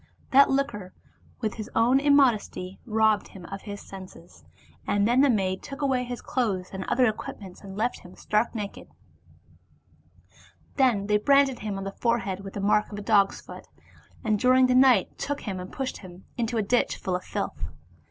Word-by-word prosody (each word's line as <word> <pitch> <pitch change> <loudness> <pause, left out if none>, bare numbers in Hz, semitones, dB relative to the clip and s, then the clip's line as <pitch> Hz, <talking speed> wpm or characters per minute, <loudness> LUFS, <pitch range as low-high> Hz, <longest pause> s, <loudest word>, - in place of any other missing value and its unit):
That 275 +1 +7
liquor, 240 -9 -2 0.5
like 215 - 0
his 215 -2 -7
own 245 +4 +4
immod 280 -3 +5
esty, 190 -3 -8
robbed 220 -1 +2
him 185 -3 -12
of 195 +2 -7
his 205 -1 -7
senses, 185 -3 -12 0.4
and 205 0 +2
then 245 +3 +4
the 285 - +5
maids 190 -5 0
took 275 +1 -6
away 260 -2 +1
his 245 0 -6
clothes 200 -8 -2
and 190 0 -4
other 255 - +2
equipments 205 -4 -5
and 195 -1 -10
left 235 +3 -1
him 180 0 -14
stark 215 +3 0
naked; 205 -2 -6 1.9
then 245 -8 +3
they 210 0 +3
branded 275 +1 +3
him 205 -2 -4
on 195 - -5
the 195 - -4
forehead 220 -4 -1
with 195 0 -9
the - - -3
mark 210 +2 +2
of 205 - -6
a - - -5
dog's 200 -2 +3
foot, - - -11 0.6
and 215 -3 +1
during 255 +2 +5
the 255 - +2
night 255 -6 +4
took 285 0 -3
him 195 -4 -4
and 180 0 -8
pushed 265 -1 -4
him 185 -1 -13
into 235 -1 -2
a 220 - +1
ditch 245 +5 +1
full 185 -2 -2
of 180 - -4
filth. - - -4
215 Hz, 190 wpm, -26 LUFS, 195-250 Hz, 1.9 s, That